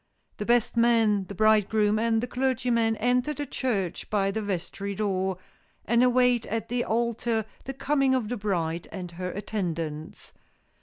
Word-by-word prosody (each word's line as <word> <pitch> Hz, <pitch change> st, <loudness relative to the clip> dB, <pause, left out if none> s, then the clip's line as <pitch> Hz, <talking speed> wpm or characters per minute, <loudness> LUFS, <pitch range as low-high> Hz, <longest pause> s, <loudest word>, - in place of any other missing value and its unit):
The 210 Hz, -, -4 dB
best 240 Hz, -1 st, +2 dB
man, 225 Hz, -4 st, +3 dB
the 200 Hz, -, -8 dB
bridegroom, 215 Hz, +1 st, +3 dB
and 225 Hz, 0 st, +2 dB
the 245 Hz, -, -2 dB
clergyman 245 Hz, -3 st, +1 dB
enter 250 Hz, +6 st, +1 dB
the 290 Hz, -, -3 dB
church 215 Hz, -10 st, -2 dB
by 195 Hz, -2 st, +1 dB
the 220 Hz, +2 st, -2 dB
vestry 200 Hz, 0 st, -4 dB
door, 190 Hz, -2 st, -1 dB, 0.5 s
and 235 Hz, +3 st, +3 dB
await 250 Hz, -2 st, +3 dB
at 225 Hz, 0 st, -3 dB
the 245 Hz, 0 st, 0 dB
altar 230 Hz, -1 st, 0 dB, 0.2 s
the 270 Hz, -, -4 dB
coming 275 Hz, -1 st, +2 dB
of 245 Hz, -5 st, -1 dB
the 245 Hz, +2 st, -3 dB
bride 175 Hz, -5 st, -2 dB
and 180 Hz, -3 st, -6 dB
her 180 Hz, +1 st, -5 dB
attendants. 170 Hz, -6 st, -4 dB
220 Hz, 155 wpm, -27 LUFS, 195-240 Hz, 0.5 s, man